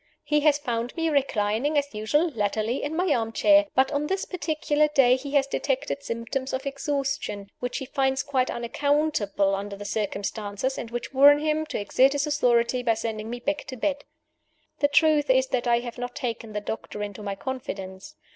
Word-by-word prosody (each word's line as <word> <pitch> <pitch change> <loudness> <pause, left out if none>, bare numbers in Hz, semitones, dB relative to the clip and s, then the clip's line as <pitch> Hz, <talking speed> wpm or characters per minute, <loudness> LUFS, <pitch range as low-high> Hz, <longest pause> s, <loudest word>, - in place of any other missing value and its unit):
He 300 0 +2
has 295 -1 +4
found 240 -4 -3
me 330 -1 0
reclining 265 0 +1
as 285 -2 0
usual 295 +11 +1
(latterly) 220 +1 -1
in 295 +2 -3
my 350 -2 +2
arm 225 -1 -1
chair; 300 +5 +5
but 265 +1 +3
on 295 0 -1
this 385 +2 -1
particular 305 -4 0
day 270 -4 +4
he 275 +2 -6
has 275 -1 +4
detected 275 0 -2
symptoms 260 +2 -4
of 260 +2 -3
exhaustion, 275 -8 -3
which 245 0 -3
he 265 - -4
finds 265 0 0
quite 260 -2 0
unaccountable 235 -6 0
under 200 +1 -3
the 205 +1 -9
circumstances, 205 +3 -2
and 230 - -6
which 240 +3 -5
warn 285 +2 +7
him 310 +1 -1
to - - -3
exert 260 +6 +3
his 285 +1 0
authority 250 -4 +2
by 230 -2 +2
sending 220 -1 -4
me 245 +1 -5
back 295 +4 -2
to 260 - -7
my - - -14
bed. 285 +1 -1 0.8
The 285 - +4
truth 295 0 +3
is 260 0 +4
that 245 -1 -1
I 235 0 +3
have 240 0 -7
not 245 0 -5
taken 230 -3 -4
the 210 - -2
doctor 210 0 -5
into 205 +1 -6
my 200 -1 -4
confidence. 195 -6 -6
260 Hz, 195 wpm, -26 LUFS, 225-290 Hz, 0.8 s, warn